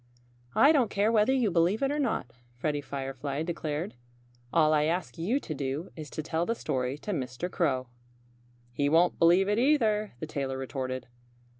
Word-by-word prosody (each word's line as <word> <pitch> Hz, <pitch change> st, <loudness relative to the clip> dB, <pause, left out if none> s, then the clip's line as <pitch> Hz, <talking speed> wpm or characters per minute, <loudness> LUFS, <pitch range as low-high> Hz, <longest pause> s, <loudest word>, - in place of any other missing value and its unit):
"I 280 Hz, -, +7 dB
don't 265 Hz, -8 st, +3 dB
care 205 Hz, +3 st, +2 dB
whether 220 Hz, +2 st, +4 dB
you 250 Hz, -6 st, +2 dB
believe 175 Hz, +8 st, +2 dB
it 275 Hz, -, +2 dB
or 295 Hz, -, -1 dB
not," 225 Hz, -, -1 dB, 0.2 s
Freddie 145 Hz, +3 st, -1 dB
Firefly 140 Hz, +1 st, -4 dB
declared. 160 Hz, 0 st, -3 dB, 0.6 s
"All 155 Hz, -2 st, +4 dB
I 150 Hz, -1 st, +3 dB
ask 170 Hz, +1 st, -2 dB
you 220 Hz, +12 st, +1 dB
to 165 Hz, -, -5 dB
do 140 Hz, +4 st, -4 dB
is 155 Hz, -3 st, -8 dB
to 155 Hz, -, -5 dB
tell 160 Hz, +1 st, -1 dB
the 230 Hz, +6 st, -1 dB
story 130 Hz, -, -2 dB
to 205 Hz, -, -5 dB
Mr. 140 Hz, +2 st, -3 dB
Crow." 130 Hz, -9 st, 0 dB, 0.9 s
"He 145 Hz, +3 st, +1 dB
won't 170 Hz, +3 st, +3 dB
believe 175 Hz, +3 st, +5 dB
it, 210 Hz, +2 st, +2 dB
either," 225 Hz, -6 st, +2 dB
the -, -, -3 dB
tailor 140 Hz, -3 st, -3 dB
retorted. 130 Hz, -1 st, -4 dB
165 Hz, 175 wpm, -29 LUFS, 140-210 Hz, 0.9 s, I